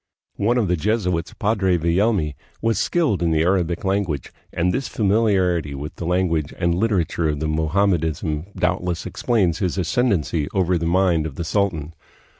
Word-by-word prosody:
One 120 +5 +2
of 115 -5 +1
the 90 - +2
Jesuits, 90 -2 -1
Padre 100 -4 +1
Villelmi, 85 -1 +1 0.3
was 115 0 0
skilled 155 - +1
in 85 - +2
the 80 0 +2
Arabic 90 0 0
language, 95 -8 -1 0.2
and 90 +2 0
this 135 -1 -1
familiarity 95 -8 +1
with 75 +2 -7
the 85 - -4
language 85 -4 0
and 85 -1 +1
literature 85 -5 0
of 75 -1 -2
Mo 80 +1 -1
hammedanism 80 -3 0
doubtless 90 -1 -1
explains 100 -9 0
his 90 -2 -1
ascendency 85 - 0
over 90 -2 +2
the 85 - -1
mind 85 -3 +2
of 70 - -9
the 85 - -3
sultan. 85 -4 -1
90 Hz, 160 wpm, -22 LUFS, 80-100 Hz, 0.3 s, One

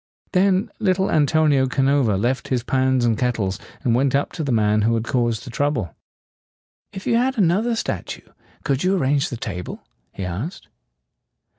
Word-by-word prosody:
Then 190 +1 +2
little 190 -2 +1
Antonio 150 -3 +3
Ca 135 +1 0
no 140 +1 +3
va 110 -6 +1
left 120 +6 -1
his 125 -3 -1
pans 130 -1 +1
and 115 -2 +2
kettles, 115 -7 -1 0.2
and 120 -4 +2
went 135 +2 +2
up 140 - 0
to 160 - -4
the 140 - -1
man 105 -2 +2
who 115 +2 +2
had 115 - -1
caused 120 -2 -1
the 125 - -8
trouble. 125 - -1 1.0
"If 190 -1 -8
you 230 - +2
had 260 +2 +1
another 210 +5 +2
statue, - - -4 0.4
could 140 +1 0
you 190 +2 +2
arrange 140 -3 +1
the 120 - -5
table?" 90 -6 -6 0.3
he 95 - -6
asked. 105 - -6
135 Hz, 175 wpm, -22 LUFS, 115-165 Hz, 1.0 s, Antonio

